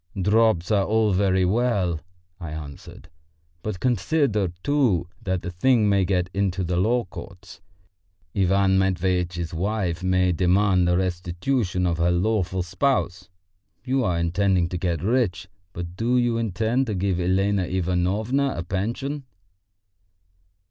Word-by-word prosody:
"Drops 105 -2 +2
are 100 -2 +3
all 110 0 +2
very 95 -1 +2
well," 95 -6 0 0.4
I 85 - -6
answered, 75 -2 -9 0.5
"but 105 -2 -4
consider, 120 - +1 0.2
too, 120 - +1
that 95 -2 -2
the 90 - -4
thing 110 +4 +2
may 100 -2 +3
get 90 -1 0
into 95 -2 0
the 90 0 -2
law 115 +6 +2
courts. 95 0 -11 0.7
Ivan 95 0 +3
Matveitch's 90 -2 -1
wife 90 -1 -2
may 95 0 +2
demand 90 +1 +2
the 90 0 +2
restitution 90 +3 -1
of 85 -2 0
her 85 +1 +3
lawful 95 0 0
spouse. 90 -1 -1 0.6
You 130 0 +1
are 90 -6 0
intending 90 +1 +1
to 90 - -3
get 85 -1 -2
rich, 115 -3 0 0.2
but 85 0 -7
do 120 +5 +1
you 120 -1 +2
intend 115 +5 0
to 105 - -2
give 95 -1 0
Elena 95 +2 +1
Ivanovna 95 +10 0
a 85 - -3
pension?" 120 +10 -3
95 Hz, 135 wpm, -24 LUFS, 90-110 Hz, 0.7 s, are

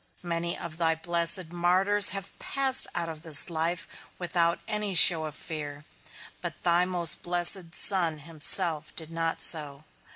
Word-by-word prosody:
Many 170 0 -4
of 160 -2 -9
thy 165 -1 0
blessed 170 +1 +2
martyrs 185 +4 +2
have 195 0 -6
passed 270 -1 +2
out 170 -1 -3
of 160 -2 -9
this 160 +1 +4
life 165 +1 -4 0.3
without 170 -1 -2
any 210 -2 -4
show 165 -2 +6
of 155 -1 -9
fear; 150 -2 -9 0.6
but - - -8
thy 175 +1 +1
most 175 -3 -1
blessed 175 0 +2
Son 175 -6 -1
himself 160 +1 0
did 160 -1 -9
not 165 0 -4
so. 150 -3 0
170 Hz, 150 wpm, -26 LUFS, 160-180 Hz, 0.6 s, show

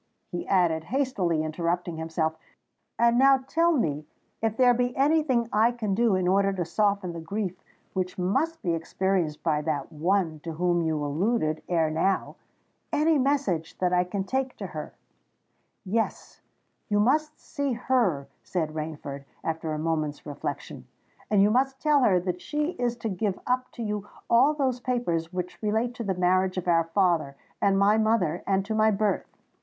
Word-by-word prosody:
he 175 - -4
added, 170 -4 +2
hastily 205 - 0
interrupting 170 +2 -2
himself. 160 0 -1 0.6
"And 235 +1 +4
now 270 0 +6
tell 335 +4 +3
me 150 - -1 0.3
if 225 -1 0
there 250 -1 +6
be 245 +1 -1
any 300 +4 +4
thing 250 -6 +1
I 220 +3 +4
can 220 -5 -2
do 225 -1 +3
in 185 -1 0
order 195 +1 +3
to 180 -3 -2
soften 200 0 0
the 170 - -6
grief 190 +3 -3 0.4
which 185 -1 -2
must 225 - 0
be 175 -3 +1
experienced 165 -1 -1
by 155 -3 +1
that 150 -3 -3
one 165 0 0
to 165 +2 -6
whom 175 +1 +1
you 155 -2 -1
alluded 155 +1 0
ere 165 -3 +2
now—any 290 - -1
message 255 - 0
that 180 -1 +1
I 180 0 +4
can 190 +2 -3
take 260 +5 -2
to - - -5
her——" - - -7 0.9
"Yes: 225 +4 -2 0.5
you 205 0 +2
must 300 +7 +1
see 285 -4 -3
her," 225 - +1
said 160 -4 -2
Rainford, 150 -3 -6 0.2
after 160 -1 -3
a 155 - -2
moment's 155 -2 -2
reflection; 145 -2 -6 0.4
"and 205 -2 +4
you 205 - +4
must 265 +3 +1
tell 300 -2 +3
her 195 -7 +4
that 180 0 -3
she 300 +2 -1
is 245 -6 -1
to 235 -1 -4
give 195 0 -2
up 255 0 0
to 235 - -5
you 210 -1 -3 0.2
all 265 +6 +5
those 260 -4 0
papers 175 -11 -1
which 180 -1 -5
relate 220 +3 0
to 240 - -5
the 195 -3 -1
marriage 185 +1 +2
of 180 - -3
our 165 -1 +3
father 165 -5 +1 0.3
and 195 -1 +3
my 205 +2 +4
mother 210 -7 +1
and 195 0 +1
to 220 - -3
my 215 0 +4
birth. 210 0 -1
195 Hz, 170 wpm, -27 LUFS, 165-240 Hz, 0.9 s, now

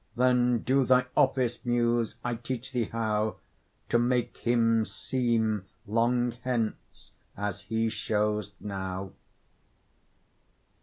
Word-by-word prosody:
Then 125 -1 +3
do 135 +1 +3
thy 125 0 +4
office, 130 -3 +2
Muse; 120 -2 +1
I 120 - 0
teach 125 +2 -5
thee 120 -3 0
how 110 -1 -1 0.5
To 120 - +3
make 120 0 +1
him 115 -1 +3
seem 115 -5 0 0.2
long 120 +3 +2
hence 120 -4 -3 0.3
as 105 -1 -3
he 110 +2 -1
shows 105 -1 -1
now. 95 -1 -4
115 Hz, 105 wpm, -28 LUFS, 110-125 Hz, 0.5 s, thy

